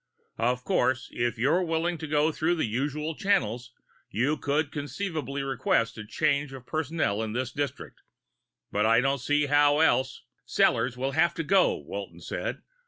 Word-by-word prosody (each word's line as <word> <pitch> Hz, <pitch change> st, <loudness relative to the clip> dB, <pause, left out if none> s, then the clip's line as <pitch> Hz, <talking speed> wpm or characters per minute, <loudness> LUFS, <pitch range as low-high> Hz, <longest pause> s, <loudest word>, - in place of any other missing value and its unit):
Of 125 Hz, +2 st, +1 dB
course, 130 Hz, 0 st, +1 dB
if 120 Hz, 0 st, -1 dB
you're 145 Hz, +10 st, +2 dB
willing 165 Hz, 0 st, -1 dB
to 160 Hz, -, -5 dB
go 150 Hz, +1 st, +2 dB
through 160 Hz, +3 st, 0 dB
the 160 Hz, -, 0 dB
usual 145 Hz, +7 st, -2 dB
channels, 125 Hz, -, 0 dB, 0.4 s
you 125 Hz, +9 st, +1 dB
could 145 Hz, 0 st, -1 dB
conceivably 145 Hz, -2 st, -4 dB
request 135 Hz, -, 0 dB
a -, -, -5 dB
change 140 Hz, +3 st, 0 dB
of 130 Hz, -2 st, -10 dB
personnel 155 Hz, -9 st, -1 dB
in 110 Hz, -1 st, -3 dB
this 125 Hz, +1 st, -2 dB
district. 140 Hz, -1 st, -5 dB, 0.7 s
But 105 Hz, +1 st, +2 dB
I 115 Hz, +1 st, +5 dB
don't 135 Hz, +2 st, +1 dB
see 145 Hz, +3 st, +2 dB
how 145 Hz, 0 st, +4 dB
else 130 Hz, -4 st, +2 dB
" -, -, -49 dB
"Sellors 125 Hz, +2 st, +3 dB
will 135 Hz, +2 st, -1 dB
have 170 Hz, +4 st, +2 dB
to 165 Hz, -, -2 dB
go," 190 Hz, +4 st, +4 dB
Walton -, -, -7 dB
said. -, -, -4 dB
145 Hz, 170 wpm, -27 LUFS, 125-160 Hz, 0.7 s, I